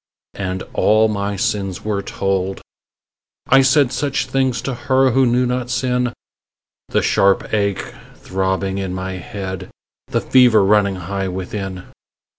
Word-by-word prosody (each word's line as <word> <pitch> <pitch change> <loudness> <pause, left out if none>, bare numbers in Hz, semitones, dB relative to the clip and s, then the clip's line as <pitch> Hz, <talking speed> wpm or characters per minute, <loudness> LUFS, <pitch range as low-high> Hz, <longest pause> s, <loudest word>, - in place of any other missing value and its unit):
And 95 -1 -3
all 110 +1 +4
my 100 -1 -2
sins 95 -1 -2
were 105 -2 -1
told; 95 -1 -2 0.9
I 135 +1 +7
said 135 -1 +3
Such 140 -1 -1
things 130 -2 0
to 135 - -2
her 130 0 +2
who 130 +2 +3
knew 125 +1 +2
not 125 0 -2
sin 125 -1 0 0.8
The - - +1
sharp 100 +2 +2
ache 100 -2 -1 0.2
throbbing 95 +1 -2
in 95 -2 -3
my 95 0 -4
head, 95 0 -6 0.4
The - - 0
fever 120 -5 +5
running 100 -1 +3
high 95 +2 -3
within. 95 0 -5
100 Hz, 135 wpm, -19 LUFS, 95-125 Hz, 0.9 s, I